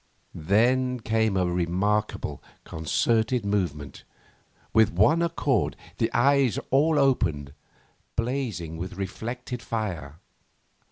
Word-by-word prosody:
Then 125 Hz, +9 st, +2 dB
came 110 Hz, -3 st, +1 dB
a 90 Hz, -, +2 dB
remarkable, 90 Hz, +4 st, -1 dB, 0.2 s
concerted 110 Hz, +8 st, 0 dB
movement. 85 Hz, -9 st, -2 dB, 0.7 s
With 110 Hz, -2 st, +5 dB
one 115 Hz, -, +3 dB
accord 130 Hz, -, 0 dB, 0.2 s
the -, -, +1 dB
eyes 135 Hz, 0 st, +3 dB
all 150 Hz, +4 st, +3 dB
opened, 85 Hz, -, +1 dB, 0.6 s
blazing 115 Hz, -, -2 dB
with 90 Hz, +2 st, -6 dB
reflected 120 Hz, +5 st, -5 dB
fire. 90 Hz, -12 st, -4 dB
110 Hz, 95 wpm, -26 LUFS, 90-125 Hz, 0.7 s, With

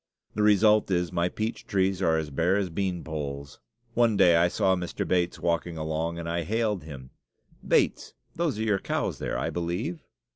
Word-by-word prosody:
The 105 Hz, -, -1 dB
result 105 Hz, 0 st, +4 dB
is, 90 Hz, -2 st, 0 dB
my 90 Hz, 0 st, 0 dB
peach 110 Hz, +4 st, -4 dB
trees 95 Hz, -2 st, +1 dB
are 80 Hz, -3 st, +3 dB
as 80 Hz, -2 st, -3 dB
bare 85 Hz, +7 st, +2 dB
as 95 Hz, -4 st, -1 dB
bean 90 Hz, -1 st, -2 dB
poles. 70 Hz, -3 st, -6 dB, 0.3 s
One 115 Hz, -3 st, +3 dB
day 85 Hz, -1 st, +6 dB
I 85 Hz, +1 st, +4 dB
saw 95 Hz, +2 st, +2 dB
Mr. 90 Hz, -1 st, -4 dB
Bates 90 Hz, -1 st, +1 dB
walking 85 Hz, 0 st, -1 dB
along, 80 Hz, +2 st, -2 dB
and 85 Hz, -1 st, -5 dB
I 85 Hz, +1 st, -1 dB
hailed 105 Hz, +2 st, -1 dB
him: 65 Hz, -5 st, -10 dB, 0.6 s
"Bates, -, -, +1 dB, 0.2 s
those 160 Hz, -9 st, -1 dB
are 110 Hz, -, -1 dB
your 105 Hz, -3 st, +1 dB
cows -, -, -2 dB
there, -, -, -2 dB
I -, -, -2 dB
believe?" 95 Hz, -, -3 dB
90 Hz, 185 wpm, -27 LUFS, 85-105 Hz, 0.6 s, day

